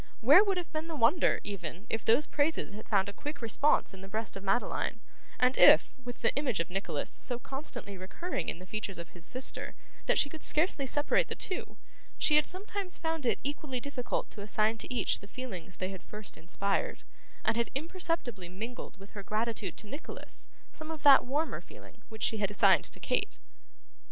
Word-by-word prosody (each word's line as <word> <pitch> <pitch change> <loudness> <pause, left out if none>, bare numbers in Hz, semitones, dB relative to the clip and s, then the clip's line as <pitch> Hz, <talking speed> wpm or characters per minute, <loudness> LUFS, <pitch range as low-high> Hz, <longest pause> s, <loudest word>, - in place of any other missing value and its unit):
Where 290 - +8
would 395 -3 +1
have 350 -2 -4
been 310 +1 -2
the 325 - -4
wonder, 280 +5 +4
even, 185 -1 -5
if 225 - -2
those 245 +7 +4
praises 290 -7 0
had 215 - -10
found 200 -2 +3
a 200 - -5
quick 295 +8 -6
response 240 +4 +2
in 190 - -10
the 195 - -8
breast 215 +2 -3
of 195 - -7
Madeline, 210 +3 0 0.4
and 250 +1 +4
if, - - +8
with 245 -1 -7
the - - +3
image 265 - 0
of 165 +2 -1
Nicholas 195 +2 -2
so 245 - -3
constantly 245 -7 -4
recurring 270 - -3
in - - -3
the 180 - -10
features 200 -1 -4
of 170 0 -7
his 175 0 -11
sister 255 +1 -2 0.3
that - - +4
she - - +5
could 315 +2 -9
scarcely 305 -4 +1
separate 290 +3 +2
the - - -3
two, 370 - -4 0.4
she 300 - +4
had 300 - +5
sometimes 390 0 -3
found 320 -5 -2
it - - +3
equally 285 -2 -3
difficult 255 -1 -3
to 210 - -8
assign 215 +2 +1
to - - -3
each 250 - +2
the 200 - -12
feelings 195 -7 -7
they 185 - -3
had 190 - -8
first 210 -1 -6
inspired, 195 +4 -2 0.4
and - - +3
had 235 0 +1
imperceptibly 305 - -2
mingled 220 +5 -7
with 195 +1 -13
her 205 - -7
gratitude 220 +3 -2
to - - -8
Nicholas, 285 +9 -9 0.2
some 315 0 -9
of 320 -2 -6
that 280 -2 +8
warmer 295 +5 -1
feeling - - -15
which 220 -2 -7
she 220 - +2
had 200 -2 +1
assigned 205 - +5
to - - -6
Kate? - - 0
240 Hz, 200 wpm, -31 LUFS, 200-295 Hz, 0.4 s, Where